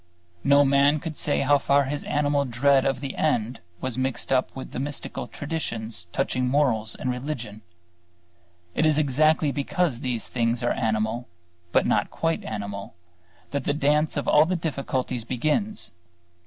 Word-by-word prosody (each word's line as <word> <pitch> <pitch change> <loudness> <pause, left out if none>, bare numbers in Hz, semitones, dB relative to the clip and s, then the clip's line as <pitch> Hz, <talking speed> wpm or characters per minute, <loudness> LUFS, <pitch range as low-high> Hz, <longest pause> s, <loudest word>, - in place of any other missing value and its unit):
No 140 0 +6
man 140 +2 +4
could 160 0 -5
say 145 - 0
how 140 +1 +4
far 140 +1 +3
his 145 +2 -3
animal 145 -1 +1
dread 135 +2 +3
of 135 -1 0
the 135 -2 -4
end 120 -6 0 0.2
was 130 -1 -2
mixed 130 -1 -2
up 130 0 +2
with 130 - -7
mystical 140 +3 -4
traditions 115 - -4
touching 130 +1 0
morals 125 -6 +1
and 130 - -2
religion. 125 -5 -5 1.1
It - - +1
is 155 -2 +4
exactly 155 +1 +3
because 145 -1 0
these 125 -3 -2
things 120 0 0
are 120 - +2
animal, 110 +1 -1 0.4
but - - +3
not - - +2
quite 165 0 -1
animal, 100 -3 -5 0.6
that 140 - -2
the 145 - +1
dance 150 +1 +2
of - - -2
all 150 +1 +6
the 185 +3 0
difficulties 135 -6 -2
begins. 155 - -1
135 Hz, 155 wpm, -25 LUFS, 120-150 Hz, 1.1 s, No